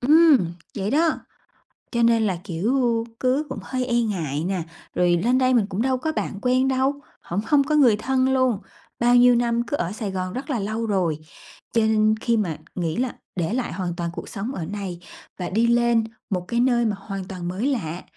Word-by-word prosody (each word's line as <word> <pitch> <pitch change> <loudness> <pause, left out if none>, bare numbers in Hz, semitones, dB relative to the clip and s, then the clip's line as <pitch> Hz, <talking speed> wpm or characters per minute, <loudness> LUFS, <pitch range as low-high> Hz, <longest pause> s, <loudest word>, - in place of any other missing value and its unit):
ừm. 310 +2 +6 0.4
Vậy 195 +2 -1
đó, 320 +4 +3 0.8
cho 235 -1 +1
nên 230 -1 +4
là, 185 -3 -1
kiểu, 230 +6 0 0.2
cứ 265 +4 +1
cũng - - -5
hơi 255 -1 -2
e 240 -1 +2
ngại 165 -10 -2
nè. 185 -1 -1 0.3
Rồi 175 -1 +3
lên 250 +2 +3
đây 255 0 +3
mình 230 -4 +4
cũng 195 +3 -2
đâu 260 0 +1
có 315 +5 -2
bạn 205 -9 -3
quen 255 +1 +2
đâu, 265 +1 +2 0.3
hổng 180 +4 -3
hông 290 -2 +4
có 305 +2 0
người 255 -8 +6
thân 260 +4 +1
luôn. 255 -5 +2 0.4
Bao 240 +1 +4
nhiêu 245 0 +7
năm 235 0 +1
cứ 290 - -1
ở 175 - -2
Sài 210 -1 -4
Gòn 185 -1 -3
rất 265 +3 -5
là 250 - 0
lâu 220 +3 -2
rồi, 180 -7 0 0.5
cho 230 - +3
nên 215 0 +3
khi 235 -2 +2
mà 175 -8 -1 0.2
nghĩ 165 -3 -2
là 250 0 -1 0.2
để 175 +3 -1
lại 250 0 -2
hoàn 180 -1 -3
toàn 170 -1 -3
cuộc - - -7
sống 205 +6 -4
ở 165 - -4
này 190 -2 -5 0.4
và 180 - -4
đi 225 +4 +2
lên 235 -1 +3 0.3
một 180 -3 -2
cái 235 - 0
nơi 240 -1 +3
mà 215 -2 0
hoàn 195 -1 -6
toàn 180 -3 -6
mới 190 +8 -1
lạ, 180 - -2
230 Hz, 215 wpm, -23 LUFS, 190-255 Hz, 0.8 s, nhiêu